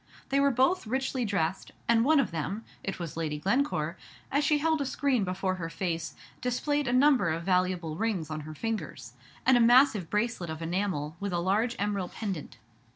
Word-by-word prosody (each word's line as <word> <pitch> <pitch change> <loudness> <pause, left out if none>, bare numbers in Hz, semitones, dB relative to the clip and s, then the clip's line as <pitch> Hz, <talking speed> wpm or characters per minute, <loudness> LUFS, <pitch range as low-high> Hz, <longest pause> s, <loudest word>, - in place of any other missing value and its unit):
They 275 - +2
were 280 0 +4
both 265 +4 +2
richly 260 +1 -1
dressed, 190 -3 -1
and 230 -1 +4
one 305 +3 +5
of 265 - +1
them 165 +8 -3 0.2
(it 195 - -3
was 170 -3 -6
Lady 155 -2 -2
Glencore), 255 - 0 0.3
as 285 +2 +2
she 300 0 +3
held 315 0 +1
a - - 0
screen 260 -4 +1
before 185 0 -1
her 165 - -3
face, 165 -4 -3 0.3
displayed 290 +3 0
a - - +1
number 255 - +4
of 165 +1 -2
valuable 180 -3 0
rings 195 -6 -2
on 155 - -3
her 155 +1 -8
fingers, 225 +6 -4 0.3
and 260 -1 +6
a - - +4
massive 235 - +5
bracelet 210 -5 -1
of 160 0 -5
enamel 170 -3 -2
with 200 -2 -3
a - - +1
large 210 +7 +1
emerald 200 -3 -2
pendant. 185 - -5
205 Hz, 190 wpm, -29 LUFS, 170-255 Hz, 0.3 s, and